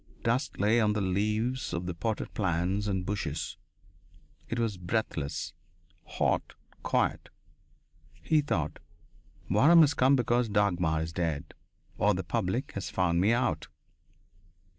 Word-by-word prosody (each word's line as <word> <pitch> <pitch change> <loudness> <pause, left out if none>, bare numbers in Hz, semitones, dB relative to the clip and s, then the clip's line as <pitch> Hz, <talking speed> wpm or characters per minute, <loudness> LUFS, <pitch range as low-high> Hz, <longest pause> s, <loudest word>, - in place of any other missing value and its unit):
Dust 120 +4 0
lay 110 +4 +3
on 105 -1 +2
the 105 - -1
leaves 105 +6 -1
of 85 +1 -2
the 90 - -3
potted 110 +6 -3
plants 95 +2 0
and 95 -2 -1
bushes. 85 -7 -3 0.9
It 115 - -2
was 115 -3 0
breathless, 90 -6 -2 0.6
hot, - - 0 0.3
quiet. - - 0 0.9
He 155 -2 +3
thought: 75 - -2 0.7
"Waram 150 - +6
has 145 -2 +5
come 135 +1 +4
because 120 -2 +1
Dagmar 90 -6 +1
is 80 0 -6
dead. 80 -3 -2 0.5
Or - - +3
the 95 - -3
public 115 - -2
has 95 -3 -5
found 85 -2 +1
me 105 +4 +4
out!" 120 0 0
100 Hz, 130 wpm, -29 LUFS, 90-115 Hz, 0.9 s, Waram